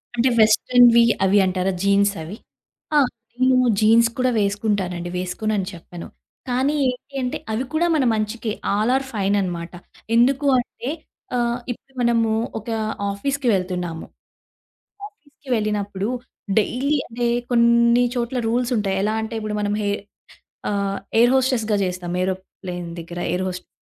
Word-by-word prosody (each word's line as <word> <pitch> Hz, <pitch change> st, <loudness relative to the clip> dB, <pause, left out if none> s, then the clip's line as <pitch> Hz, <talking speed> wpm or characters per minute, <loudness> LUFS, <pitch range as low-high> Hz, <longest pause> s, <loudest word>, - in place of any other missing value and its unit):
అంటే 245 Hz, +2 st, +3 dB
వెస్ట్రన్‌వి 235 Hz, +2 st, +6 dB, 0.2 s
అవి 195 Hz, +2 st, +4 dB
అంటారా 185 Hz, +1 st, 0 dB
జీన్స్ 200 Hz, 0 st, +3 dB
అవి? 195 Hz, +7 st, -8 dB, 0.6 s
ఆ! -, -, +7 dB, 0.4 s
నేను 255 Hz, 0 st, +5 dB, 0.2 s
జీన్స్ 230 Hz, +2 st, +5 dB
కూడా 255 Hz, 0 st, +2 dB
వేసుకుంటానండి. 200 Hz, -4 st, -1 dB
వేసుకోనని 190 Hz, +2 st, -2 dB
చెప్పను. 175 Hz, 0 st, -10 dB, 0.4 s
కానీ 265 Hz, +4 st, +1 dB
ఏంటి 250 Hz, +2 st, -8 dB
అంటే 250 Hz, +4 st, -2 dB
అవి 220 Hz, +4 st, -1 dB
కూడా 340 Hz, +2 st, +2 dB
మన 290 Hz, -, +2 dB
మంచికే. 215 Hz, +1 st, -2 dB, 0.2 s
ఆల్ 215 Hz, +4 st, +1 dB
ఆర్ 270 Hz, 0 st, 0 dB
ఫైన్ 200 Hz, -1 st, +1 dB
అన్నమాట. 175 Hz, -2 st, -4 dB, 0.4 s
ఎందుకు 270 Hz, +4 st, +3 dB
అంటే 245 Hz, +1 st, -6 dB, 0.5 s
ఆహ్, 240 Hz, 0 st, 0 dB
ఇప్పుడు 265 Hz, +3 st, -11 dB
మనము 230 Hz, -2 st, +2 dB, 0.3 s
ఒక 220 Hz, -, -10 dB, 0.4 s
ఆఫీసు‌కి 270 Hz, +6 st, -2 dB
వెళ్తున్నాము. 180 Hz, -3 st, -2 dB, 1.0 s
ఆఫీ‌సుకి 290 Hz, -8 st, -20 dB
వెళ్ళినప్పుడు 205 Hz, -1 st, -2 dB, 0.5 s
డైలీ 270 Hz, +7 st, 0 dB
అంటే 240 Hz, +1 st, -2 dB, 0.2 s
కొన్ని 235 Hz, 0 st, +4 dB
చోట్ల 245 Hz, +1 st, -2 dB
రూల్సుంటాయి. 230 Hz, -5 st, 0 dB
ఎలా 215 Hz, -, +1 dB
అంటే 220 Hz, +1 st, -5 dB
ఇప్పుడు 210 Hz, 0 st, -3 dB
మనం 205 Hz, 0 st, 0 dB
హె 205 Hz, -, 0 dB, 0.8 s
ఆహ్, 200 Hz, -1 st, -1 dB, 0.2 s
ఎయిర్ 240 Hz, +2 st, +5 dB
హోస్టెస్‌గా 245 Hz, -5 st, +1 dB
జేస్తాం 180 Hz, -1 st, -3 dB
ఏరోప్లెయిన్ 185 Hz, -2 st, -5 dB
దగ్గర 170 Hz, +1 st, -7 dB
ఎయిర్ 185 Hz, +1 st, -1 dB
హోస్టస్‌గా. 180 Hz, 0 st, -7 dB
215 Hz, 130 wpm, -22 LUFS, 195-245 Hz, 1.0 s, ఆ